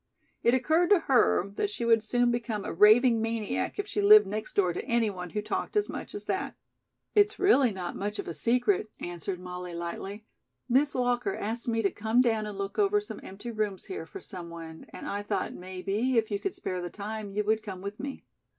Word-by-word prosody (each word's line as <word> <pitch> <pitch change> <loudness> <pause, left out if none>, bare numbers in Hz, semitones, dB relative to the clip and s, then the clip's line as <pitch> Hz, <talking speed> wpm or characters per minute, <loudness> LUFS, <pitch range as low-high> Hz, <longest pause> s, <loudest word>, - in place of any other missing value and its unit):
It 235 - +4
occurred 315 +7 +2
to 405 -4 +6
her 245 -7 +3
that 415 - 0
she 405 - -4
would 230 -1 +5
soon 245 +2 +2
become 230 -4 -2
a - - -3
raving 225 +5 +6
maniac 225 -2 -2
if 410 - -1
she 410 0 -2
lived 425 +1 +8
next 215 +2 -5
door 180 -4 +3
to - - -4
anyone 210 -7 0
who 210 +4 -3
talked 420 - -2
as 415 - +2
much - - -6
as 410 - -5
that. - - -2 0.6
"It's 420 0 +4
really 280 - +5
not 185 -3 -5
much 205 +2 -3
of - - -5
a 170 - -3
secret," 245 - +1
answered 175 +1 -5
Molly 180 -1 -7
lightly. 190 +5 -5 0.4
"Miss 275 +4 +3
Walker 245 +9 0
asked 225 +4 -4
me 225 -1 +1
to 195 - +2
come 220 +3 +1
down 225 -4 +2
and 205 -2 -6
look 200 - -4
over 415 0 +4
some 415 - -8
empty 205 +5 -8
rooms 210 -4 -2
here 385 +2 -6
for 390 - -8
someone, 170 - -9
and - - -8
I 205 - -2
thought, 205 - -2
maybe, 195 +7 -2
if 220 -1 +1
you 200 - 0
could 390 - -3
spare 185 -1 -4
the 175 - -4
time 210 +2 -5
you 205 +2 -1
would 220 +1 +1
come 195 -4 -7
with 200 +2 -6
me." 275 0 -6
220 Hz, 215 wpm, -29 LUFS, 195-255 Hz, 0.6 s, lived